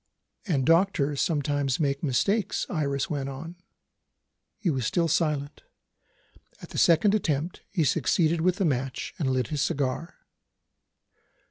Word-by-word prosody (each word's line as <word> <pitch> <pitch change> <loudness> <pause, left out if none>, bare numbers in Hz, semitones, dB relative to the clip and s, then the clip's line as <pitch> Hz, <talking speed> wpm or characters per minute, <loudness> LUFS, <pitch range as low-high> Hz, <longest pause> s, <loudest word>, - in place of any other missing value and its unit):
"And 140 -8 +1
doctors 165 -4 +2
sometimes 145 -5 0
make 140 -2 0
mistakes," 190 - 0
Iris 140 -3 -1
went 140 -5 -3
on. 165 +6 -8 1.0
He 180 - 0
was 130 -4 -1
still 170 +9 +1
silent. 150 -3 -1 1.0
At - - -11
the - - -3
second 175 +5 +4
attempt, 165 -5 -1
he 180 -5 0
succeeded 160 +2 +2
with 180 +1 +2
the 195 - 0
match, 135 -3 -2
and 145 -5 0
lit 130 -3 0
his 150 -2 -2
cigar. 140 +6 -2
150 Hz, 130 wpm, -27 LUFS, 140-170 Hz, 1.0 s, second